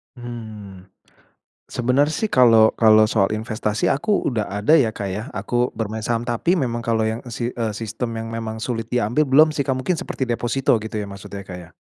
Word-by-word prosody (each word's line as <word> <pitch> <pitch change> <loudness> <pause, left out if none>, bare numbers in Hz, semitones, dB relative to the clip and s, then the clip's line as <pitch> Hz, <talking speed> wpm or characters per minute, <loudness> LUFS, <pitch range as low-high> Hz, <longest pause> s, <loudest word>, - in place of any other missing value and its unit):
Mmm, 110 -6 -9 0.8
sebenarnya 130 +5 +1
sih 220 -2 -1
kalau 115 -3 +6
kalau 110 -1 +7
soal 105 -2 +2
investasi 110 -1 -1
aku 200 +9 0
udah 110 -5 -1
ada 105 +8 0
ya 140 -8 +5
Kak 105 -2 -5
ya, 105 +6 -5
aku 120 +5 0
bermain 110 0 -3
saham, 115 +1 -1
tapi 120 +10 0
memang 120 -7 -1
kalau 115 -1 0
yang, 110 +1 -2
eee, - - -9
si 120 - -3
eee, 115 -3 -3
sistem 115 +1 -4
yang 115 0 -5
memang 115 -1 -4
sulit 115 0 -4
diambil 125 +5 +1
belum 155 +4 +6
sih 150 - -3
Kak, 130 - +1
mungkin 145 +6 -1
seperti 130 - -3
deposito 120 +2 0
gitu 110 0 -6
ya 105 - -2
maksudnya 100 0 -9
ya - - -30
Kak 90 - -6
ya? 85 - -13
115 Hz, 205 wpm, -21 LUFS, 110-125 Hz, 0.8 s, kalau